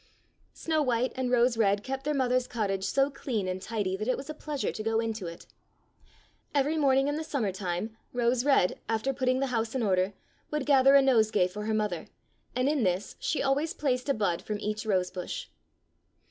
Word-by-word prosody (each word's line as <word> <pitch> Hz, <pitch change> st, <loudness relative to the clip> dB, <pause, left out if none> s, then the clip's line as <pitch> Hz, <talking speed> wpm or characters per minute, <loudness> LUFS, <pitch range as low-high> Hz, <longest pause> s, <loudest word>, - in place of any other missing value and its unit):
Snow 315 Hz, -1 st, 0 dB
white 250 Hz, -2 st, +1 dB
and 260 Hz, -1 st, -1 dB
Rose 245 Hz, -1 st, +3 dB
red 205 Hz, -2 st, +2 dB
kept 270 Hz, +1 st, -4 dB
their 300 Hz, 0 st, 0 dB
mother's 255 Hz, -1 st, +1 dB
cottage 195 Hz, -5 st, -1 dB
so 275 Hz, +1 st, +2 dB
clean 225 Hz, -8 st, -3 dB
and 185 Hz, 0 st, -3 dB
tidy 200 Hz, -2 st, -2 dB
that 215 Hz, +3 st, -4 dB
it 255 Hz, -, +1 dB
was 280 Hz, +3 st, -6 dB
a -, -, -6 dB
pleasure 300 Hz, -2 st, -3 dB
to -, -, -6 dB
go 225 Hz, +1 st, +1 dB
into 225 Hz, -5 st, -3 dB
it. 170 Hz, 0 st, -9 dB, 1.1 s
Every 285 Hz, +3 st, +2 dB
morning 270 Hz, -2 st, +3 dB
in 290 Hz, +1 st, -1 dB
the 320 Hz, -, -3 dB
summer 255 Hz, -10 st, -1 dB
time 185 Hz, +3 st, -3 dB, 0.2 s
Rose 245 Hz, 0 st, +1 dB
red, 270 Hz, -10 st, +3 dB
after 225 Hz, +4 st, 0 dB
putting 255 Hz, 0 st, +1 dB
the -, -, +2 dB
house 225 Hz, +1 st, -1 dB
in 255 Hz, -, 0 dB
order, 190 Hz, -1 st, +1 dB, 0.4 s
would 300 Hz, -3 st, -2 dB
gather 275 Hz, -1 st, +6 dB
a 275 Hz, -, +7 dB
nose 230 Hz, -5 st, +4 dB
gay 205 Hz, -5 st, +3 dB
for 210 Hz, +3 st, -6 dB
her 220 Hz, -, 0 dB
mother, 210 Hz, -5 st, -2 dB, 0.5 s
and 255 Hz, +1 st, +1 dB
in 295 Hz, -2 st, +1 dB
this 185 Hz, +1 st, -1 dB
she -, -, -1 dB
always 280 Hz, +4 st, +1 dB
placed 255 Hz, -2 st, -1 dB
a 275 Hz, -, +3 dB
bud 190 Hz, -5 st, 0 dB
from 210 Hz, -1 st, -4 dB
each 215 Hz, +1 st, -3 dB
rosebush. 185 Hz, -2 st, -2 dB
235 Hz, 200 wpm, -29 LUFS, 205-270 Hz, 1.1 s, a